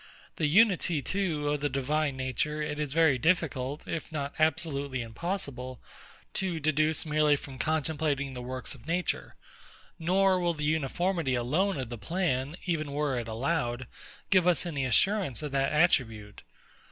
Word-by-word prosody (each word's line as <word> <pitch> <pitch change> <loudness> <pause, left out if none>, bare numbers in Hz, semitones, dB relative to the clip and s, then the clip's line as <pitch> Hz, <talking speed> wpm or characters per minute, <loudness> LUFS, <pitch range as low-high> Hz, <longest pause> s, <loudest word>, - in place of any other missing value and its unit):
The 155 - +2
unity 175 -4 +4
too 160 -4 -1
of 145 -1 -1
the 145 - +1
Divine 140 +1 0
Nature, 130 +4 -1
it 150 0 -3
is 150 -2 -2
very 155 -4 +4
difficult, 145 -3 0
if 165 - -4
not 140 -2 -3
absolutely 145 -5 +1
impossible, 130 - -4 0.5
to 180 -4 -1
deduce 155 +1 +1
merely 150 -1 +3
from 135 -2 -9
contemplating 150 -3 0
the 125 - -6
works 130 +1 -5
of 135 0 -15
nature; 175 +2 -2 0.6
nor 185 +3 +3
will 175 -1 0
the 150 -1 -3
uniformity 160 0 0
alone 155 +11 +1
of 125 -3 -4
the 120 -2 -6
plan, 145 - -1
even 155 -5 -1
were 145 -3 0
it 115 - -5
allowed, 120 +1 -1 0.5
give 185 -2 +5
us 180 0 +3
any 145 -6 -2
assurance 180 - +2
of 150 - -4
that 135 0 +1
attribute. 115 -10 +1
150 Hz, 155 wpm, -29 LUFS, 130-165 Hz, 0.6 s, give